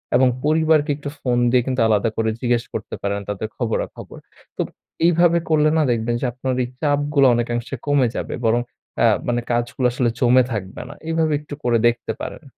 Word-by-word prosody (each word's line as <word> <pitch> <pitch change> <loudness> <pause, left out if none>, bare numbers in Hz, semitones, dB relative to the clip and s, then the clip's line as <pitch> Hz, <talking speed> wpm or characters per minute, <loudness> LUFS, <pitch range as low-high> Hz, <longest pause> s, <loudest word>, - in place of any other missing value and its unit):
এবং 130 +1 +5 0.2
পরিবারকে 155 -1 +3
একটু 145 -1 -6
ফোন 125 -2 0
দিয়ে 125 0 +4
কিন্তু 130 -2 0
আলাদা 110 +1 +2
করে 110 0 +1
জিজ্ঞেস 120 -2 +1
করতে - - -5
পারেন 100 0 -1
তাদের 105 +1 -3
খবরাখবর। 115 -3 -4 0.4
তো - - 0 0.4
এইভাবে 170 0 +4
করলে 155 -1 +4
না 155 - +3
দেখবেন 120 0 0
যে - - 0
আপনার 130 +1 -2
এই - - -3
চাপগুলো 145 -1 +2
অনেকাংশে 120 +2 -2
কমে 140 -4 +3
যাবে। - - -4
বরং 120 +2 +3 0.4
আ - - +6 0.2
মানে 120 0 0
কাজগুলো 120 +1 0
আসলে 125 -2 +1
জমে 125 0 +5
থাকবে 95 -4 -5
না। - - -8
এইভাবে 160 -1 +1
একটু 150 0 -10
করে 120 -1 +3
দেখতে 120 -1 -1
পারেন। - - -6
125 Hz, 180 wpm, -21 LUFS, 120-145 Hz, 0.4 s, আ